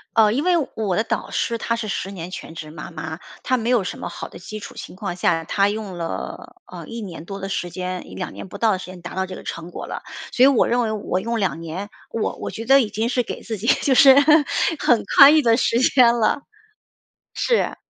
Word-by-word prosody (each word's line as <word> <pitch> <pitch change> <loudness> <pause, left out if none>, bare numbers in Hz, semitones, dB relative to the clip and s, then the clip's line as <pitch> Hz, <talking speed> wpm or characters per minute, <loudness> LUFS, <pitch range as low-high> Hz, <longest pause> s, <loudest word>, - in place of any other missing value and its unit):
呃， 215 -2 +5
因 275 +6 0
为 360 0 +3 0.2
我 205 -5 -1
的 220 - +1
导 - - -3
师 230 - -1
她 230 +1 -1
是 225 -2 -4
10 195 0 -3
年 175 -2 -7
全 180 - -8
职 155 -2 -8
妈 155 +2 -9
妈， 160 0 -6 0.2
她 255 - +1
没 230 +1 -2
有 230 -6 +3
什 - - -5
么 - - -5
好 - - -7
的 - - -11
基 215 +4 -7
础 205 - -10
情 - - -9
况 195 -3 -4
下， 165 -2 +1
她 200 +4 +1
用 205 -4 -5
了， 165 -1 -6
呃， - - -9
1 230 0 -6
年 170 -5 -8
多 195 +1 -7
的 195 0 -5
时 175 -2 -2
间， 185 0 -4
2 - - -4
年 - - -9
不 200 - -9
到 225 -2 +3
的 190 - +1
时 - - -7
间 180 -1 -11
达 175 - -8
到 190 0 0
这 185 0 -8
个 - - -9
成 165 +1 -6
果 - - -7
了。 - - -6 0.3
所 250 - +3
以 - - +9
我 275 -4 +4
认 245 +1 +2
为 220 -2 0
我 200 -3 -2
用 230 +3 -2
2 185 -4 -1
年， 180 +6 -6 0.2
我 225 - -2
我 - - -6
觉 225 - -6
得 270 +2 +6
已 225 -5 +1
经 225 +3 -1
是 250 -1 +1
给 - - -6
自 220 -2 -5
己 210 - -7 0.2
就 265 -2 +2
是 270 -2 +8 0.6
很 240 -3 +3
宽 285 +3 +10
裕 310 - +5
的 230 -2 +3
时 235 -1 +2
间 250 -2 +5
了。 235 +4 +1 0.9
是。 475 - 0
210 Hz, 255 characters per minute, -22 LUFS, 185-235 Hz, 0.9 s, 宽